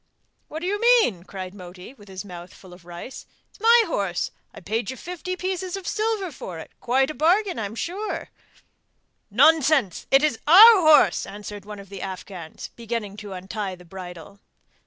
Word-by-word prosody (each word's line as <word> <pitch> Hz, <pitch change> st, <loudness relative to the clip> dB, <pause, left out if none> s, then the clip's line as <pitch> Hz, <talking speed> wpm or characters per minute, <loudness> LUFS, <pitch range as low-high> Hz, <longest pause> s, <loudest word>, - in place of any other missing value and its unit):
'What 315 Hz, -, -7 dB
do -, -, -4 dB
you 410 Hz, +3 st, -2 dB
mean?' 460 Hz, -, +3 dB
cried 185 Hz, -2 st, -7 dB
Moti, 180 Hz, +3 st, -11 dB
with 210 Hz, -6 st, -18 dB
his 190 Hz, +1 st, -8 dB
mouth 180 Hz, -1 st, -10 dB
full 185 Hz, -2 st, -15 dB
of 180 Hz, -1 st, -16 dB
rice, 175 Hz, +9 st, -9 dB, 0.2 s
'it's -, -, -22 dB
my 460 Hz, +2 st, +6 dB
horse; 195 Hz, -, -2 dB, 0.2 s
I -, -, -12 dB
paid 220 Hz, +4 st, -3 dB
you 260 Hz, -, -6 dB
fifty 360 Hz, +3 st, -6 dB
pieces 370 Hz, 0 st, -3 dB
of 380 Hz, -, -9 dB
silver 425 Hz, -4 st, -1 dB
for 185 Hz, -, -8 dB
it 160 Hz, -, -10 dB
quite 265 Hz, +3 st, +1 dB
a -, -, -8 dB
bargain, 360 Hz, -, +1 dB
I'm 210 Hz, 0 st, -5 dB
sure!' 385 Hz, -, -4 dB, 1.0 s
'Nonsense! 305 Hz, -, +3 dB
it 270 Hz, +2 st, +5 dB
is 295 Hz, -7 st, +1 dB
our 410 Hz, +5 st, +9 dB
horse,' 305 Hz, -, +5 dB
answered 205 Hz, 0 st, -9 dB
one 210 Hz, 0 st, -8 dB
of 200 Hz, -1 st, -12 dB
the 195 Hz, -, -8 dB
Afghans 185 Hz, -3 st, -8 dB
beginning 230 Hz, -3 st, -5 dB
to 205 Hz, -2 st, -8 dB
untie 190 Hz, +1 st, -5 dB
the 180 Hz, 0 st, -17 dB
bridle. 180 Hz, +1 st, -10 dB
220 Hz, 180 wpm, -24 LUFS, -, 1.0 s, our